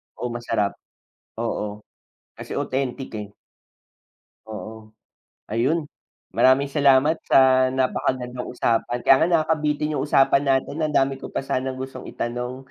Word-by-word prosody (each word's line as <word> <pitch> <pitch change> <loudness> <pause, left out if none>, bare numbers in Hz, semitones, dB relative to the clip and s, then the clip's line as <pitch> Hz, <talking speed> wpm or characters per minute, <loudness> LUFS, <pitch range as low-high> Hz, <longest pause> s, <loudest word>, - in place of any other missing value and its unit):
Oh, 125 - -4
masarap. 115 -4 -2 0.6
Oo, 105 -2 -3 0.6
kasi - - -7
authentic, 130 0 -2
eh. 105 -1 -5 1.2
Oo. 110 0 -9 0.6
Ayun, 135 +9 +1 0.5
maraming 135 +2 +3
salamat 140 +2 +4
sa 130 -1 +5
napakagandang 125 -1 -1
usapan. 120 0 0
Kaya 135 - +7
nga, - - 0 0.2
nakakabitin 150 -1 0
yung 135 - -1
usapan 140 0 +4
natin, 135 +3 0
ang 155 -1 -1
dami 135 0 +2
ko - - -7
pa - - -2
sanang 130 0 -2
gustong 130 +1 -7
itanong. 125 +2 -4
130 Hz, 125 wpm, -23 LUFS, 120-140 Hz, 1.2 s, Kaya